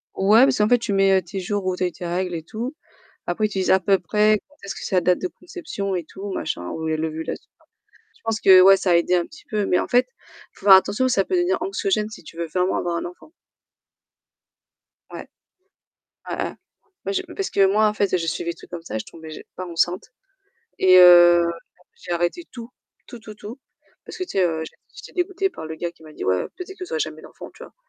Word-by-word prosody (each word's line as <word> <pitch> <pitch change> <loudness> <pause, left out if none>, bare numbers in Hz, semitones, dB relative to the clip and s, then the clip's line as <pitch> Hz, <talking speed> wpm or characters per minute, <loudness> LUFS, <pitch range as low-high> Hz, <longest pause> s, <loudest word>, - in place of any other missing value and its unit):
Ouais, 210 +5 +5
parce 270 -1 +3
qu'en 210 - +3
fait 245 - +4
tu 230 -3 -3
mets, 195 0 +3
heu, 190 - +1
tes 190 +3 -7
jours 200 +1 -3
où 185 -1 0
tu 180 - -3
as - - +2
eu - - -5
tes 175 - -9
règles 180 +1 -2
et 160 - -5
tout. 235 - -6 0.5
Après 215 +5 0
tu 200 -2 -4
disais 185 - +3
à 190 - +4
peu 195 0 +2
près 215 0 +2
quand 290 - -25
est-ce 200 - -6
que - - -9
c'est - - -2
la 180 - +4
date 180 +1 +2
de 185 - -1
conception 200 - -6
et 175 -3 -4
tout 195 +4 -8
machin 90 - -4
ou 160 - -6
même 155 0 -1
l'ovulation. 160 0 -5 0.7
Je - - -32
pense 225 -1 -1
que 185 -1 +8
ouais 195 +1 +7
ça 190 -1 0
a - - +5
aidé 170 +1 +2
un 175 -1 +1
petit 310 - -16
peu 210 -3 -1
mais 180 - +2
en - - -2
fait, 250 +1 +3
il - - -22
faut - - -14
faire 195 - +11
attention, 205 +6 +2
ça 200 -6 +1
peut 370 - -1
devenir 355 +1 +1
anxiogène 385 - -1
si 215 - -12
tu 165 - -13
veux 170 0 -3
vraiment 180 +3 0
avoir 175 -1 -2
un - - -4
enfant. 180 - -11 1.8
Ouais. - - -8 1.0
Ouais, - - -2
ouais. - - -4 0.5
Ouais - - -2
je 380 - 0
parce 390 - -3
que 195 - +3
moi 210 +3 +3
en 210 - 0
fait, 200 -2 -1
heu, - - +4
je 165 -1 -4
suivais 170 - -2
des - - -11
trucs - - -15
comme 175 -1 -6
ça 165 - -7
et - - -1
je - - -7
tombais 160 -1 -12
ja - - -8
pas 185 - -6
enceinte 175 +6 -1 0.7
et 185 -1 +6
heu, 175 -1 +8 0.5
j'ai 180 - -10
arrêté 175 - -1
tout. 235 -2 -9 0.4
Tout, 240 - -10
tout, 215 -1 -11
tout 215 +4 -9 0.5
parce - - -9
que 370 - -3
tu 370 - -9
sais, 190 -2 +2
heu, 160 -2 -2 0.3
j'étais - - -12
dégoûtée 380 +1 -1
par 260 - -9
le 160 0 -6
gars 170 +1 -4
qui 165 - -27
m'a 155 -1 -13
dit: - - -7
«Ouais, 95 0 +2
heu, - - -8
peut-être 380 +1 -8
vous 370 +5 -8
aurez 475 - -1
jamais - - -4
d'enfant», - - -12
Tu - - -11
vois? - - -14
190 Hz, 255 wpm, -22 LUFS, 175-225 Hz, 1.8 s, faire